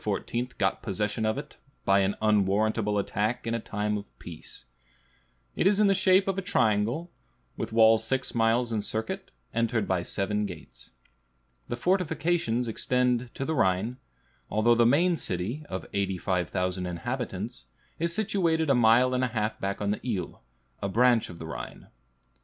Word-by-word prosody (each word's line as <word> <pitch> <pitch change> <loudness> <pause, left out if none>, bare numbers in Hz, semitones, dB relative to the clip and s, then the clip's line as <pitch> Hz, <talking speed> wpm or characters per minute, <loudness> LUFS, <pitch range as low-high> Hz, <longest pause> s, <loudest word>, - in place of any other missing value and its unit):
got 95 -1 0
possession 105 +2 -1
of 110 - 0
it, 145 +1 -8 0.3
by 100 0 +4
an 95 +1 +1
unwarrantable 105 +1 +2
attack 105 +4 -1
in 115 - -1
a 115 - 0
time 105 -1 -2
of 100 - -14
peace. - - -9 0.9
It - - +2
is 200 +1 +3
in 200 -2 +5
shape 190 0 +4
a 195 0 0
triangle, 125 - +1 0.4
with - - -4
walls 110 0 +5
six 130 +3 -1
miles 115 +1 +2
in 110 - 0
circuit, 110 +2 -4 0.2
entered 115 -2 0
by 95 -2 +1
seven 105 +3 -1
gates. 75 -9 -11 0.8
The - - -3
fortifications 165 -6 0
extend 125 +1 0
to 135 - -3
the 160 - -1
Rhine, 105 -1 +1 0.5
although 110 +3 +3
the 120 0 +4
main 170 +7 +3
city, 105 - -3
of 95 - -4
85,000 90 -1 -1
inhabitants, 120 +4 -4 0.3
is 170 +1 0
situated 170 -6 +1
a - - +6
mile 125 +1 +5
and 125 0 +1
a - - +2
half 110 -2 -2
back 100 +1 -3
on 100 0 0
the 105 - -3
Ill, 100 -9 -4 0.4
a 100 - -1
branch 120 +2 +3
of 85 - -9
the 80 - -8
Rhine. 80 - -8
115 Hz, 155 wpm, -28 LUFS, 100-130 Hz, 0.9 s, a